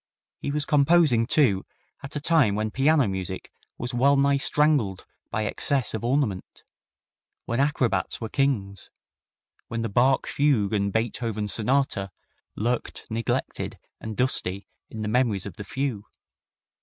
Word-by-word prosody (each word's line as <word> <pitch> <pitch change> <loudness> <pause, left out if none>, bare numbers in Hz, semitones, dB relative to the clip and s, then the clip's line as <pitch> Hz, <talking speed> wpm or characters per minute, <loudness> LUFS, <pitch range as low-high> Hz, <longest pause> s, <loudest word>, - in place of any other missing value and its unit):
He - - -4
was 145 +1 0
composing, 145 -5 +4
too, 115 -11 +3 0.4
at 140 +1 -9
a - - -1
time 145 -9 +3
when 110 +1 -2
piano 140 0 +3
music 95 -1 -4 0.3
was 120 +1 -5
well 140 +3 +4
nigh 140 0 +3
strangled 140 -9 +2 0.2
by 110 +1 -1
excess 135 +2 0
of 110 - -4
ornament, 120 -7 -1 0.8
when 115 - -2
acrobats 125 - 0
were 115 - -4
kings, 110 -7 -1 0.8
when 115 0 -3
the 115 - -2
Bach 125 +6 +3
Fugue 130 -9 +1
and 100 -1 +1
Beethoven 110 -1 -2
Sonata 110 -2 0 0.5
lurked 120 +3 -2
neglected 115 0 -2 0.2
and 110 -1 -7
dusty 100 -7 +1 0.2
in 110 - -7
the - - -2
memories 110 -4 +1
of - - -8
the 105 - -6
few. 120 -1 -3
120 Hz, 140 wpm, -25 LUFS, 105-140 Hz, 0.8 s, composing